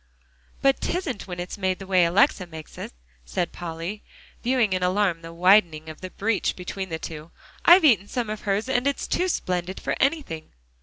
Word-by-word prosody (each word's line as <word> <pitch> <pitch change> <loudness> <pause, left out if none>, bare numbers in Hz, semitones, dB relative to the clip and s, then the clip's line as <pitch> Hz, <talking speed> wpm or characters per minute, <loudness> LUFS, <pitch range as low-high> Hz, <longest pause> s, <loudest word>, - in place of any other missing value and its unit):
"But 275 0 +4
'tisn't 330 - -3
when 180 -1 -6
it's 180 +3 -6
made 185 -1 0
the 195 - -9
way 185 -2 +4
Alexia 185 - +3
makes 160 -2 -10
it," - - -6 0.3
said 110 - -2
Polly, 170 +4 -6 0.4
viewing 240 -5 +2
in 185 - 0
alarm 180 -2 +1
the 165 0 -9
widening 170 -3 +3
of 155 - -10
the 185 - -6
breach 210 +2 -1
between 190 +1 -5
the 160 - -3
two. 160 0 -8 0.4
"I've 345 0 +8
eaten 210 - +4
some 240 +1 -2
of 215 0 -5
hers, 205 +3 -1
and 260 0 +1
it's 280 - -1
too 365 - +1
splendid 180 - -2
for - - -2
anything." 270 - -1
190 Hz, 190 wpm, -25 LUFS, 170-230 Hz, 0.4 s, I've